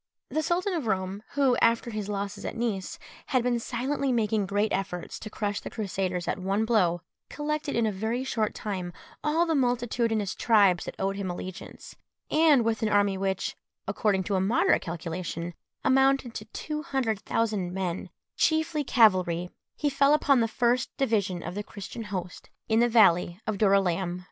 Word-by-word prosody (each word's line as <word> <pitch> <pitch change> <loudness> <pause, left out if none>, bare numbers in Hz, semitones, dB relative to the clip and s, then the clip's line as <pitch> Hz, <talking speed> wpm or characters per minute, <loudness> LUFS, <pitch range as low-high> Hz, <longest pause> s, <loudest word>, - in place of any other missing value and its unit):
The 315 - +1
Sultan 360 +5 0
of 315 -9 -2
Roum, 190 0 -1
who, 275 -3 +3
after 230 +1 +2
his 210 -2 -4
losses 200 0 -4
at - - -5
Nice, 225 - -2 0.3
had 255 -4 +1
been 240 -1 +1
silently 260 +4 -1
making 215 -4 +1
great 205 +2 0
efforts 185 -3 -3
to 215 - -7
crush 205 -1 -2
the - - -7
Crusaders 190 -4 -3
at - - -1
one 195 +4 0
blow, 180 -7 +2 0.3
collected 300 0 -3
in 230 -1 +2
a 215 - +1
very 220 +6 -2
short 220 -5 -1
time 185 -4 -4 0.3
all 315 +3 +2
the 330 - 0
multitudinous 235 -5 0
tribes 200 -6 +3
that - - -6
owed 195 +1 -1
him 195 -2 -3
allegiance, 180 +1 -8 0.4
and 305 -6 +5
with 225 -1 0
an 220 - +1
army 205 -1 +3
which, 190 0 -2 0.3
according 200 -4 +1
to 200 - -3
a 190 - +2
moderate 205 +6 +3
calculation, 170 0 -5 0.3
amounted 270 -2 +3
to 215 - -6
two 300 +7 -5
hundred 265 -9 -1
thousand 210 -5 -1
men, 185 -1 -3 0.3
chiefly 315 -1 +1
cavalry, 185 -8 +3 0.2
he 295 - -1
fell 280 +1 +4
upon 280 -3 +3
the 230 - +2
first 240 +2 +1
division 200 -9 0
of - - -5
the 205 - -3
Christian 210 +2 -8
host 185 -3 -6 0.2
in 220 0 +3
the 240 +1 +4
valley 180 -6 +4
of 215 -3 -2
Dorylæum. 190 -3 +2
215 Hz, 175 wpm, -27 LUFS, 190-250 Hz, 0.4 s, and